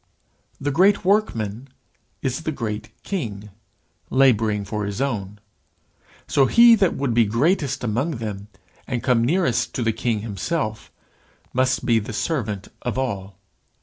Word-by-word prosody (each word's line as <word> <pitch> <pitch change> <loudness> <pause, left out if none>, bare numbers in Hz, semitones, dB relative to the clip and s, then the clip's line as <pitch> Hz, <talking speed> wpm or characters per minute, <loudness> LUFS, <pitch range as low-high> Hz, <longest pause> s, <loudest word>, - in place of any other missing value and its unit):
The 145 +1 -1
great 190 +7 +3
Workman 130 - 0 0.6
is 130 +2 -1
the 160 - -2
great 110 -5 -4
King, 105 - -4 0.6
labouring 110 -6 +3
for 105 +1 -3
his 100 +2 -4
own. 105 -7 -2 0.9
So 135 -2 +3
he 235 - +7
that 195 -5 +3
would 135 -4 -1
be 115 0 +4
greatest 140 - +1
among 125 +6 -1
them, 105 -3 -5 0.4
and 125 -3 -2
come 125 -3 +3
nearest 125 -4 +1
to 125 - -1
the 115 0 +1
King 115 -1 -1
himself, 110 +2 -3 0.6
must 130 +1 +1
be 115 -2 +4
the 110 +1 -6
servant 105 - -2
of 120 0 -3
all. 100 -7 -3
120 Hz, 140 wpm, -23 LUFS, 105-140 Hz, 0.9 s, he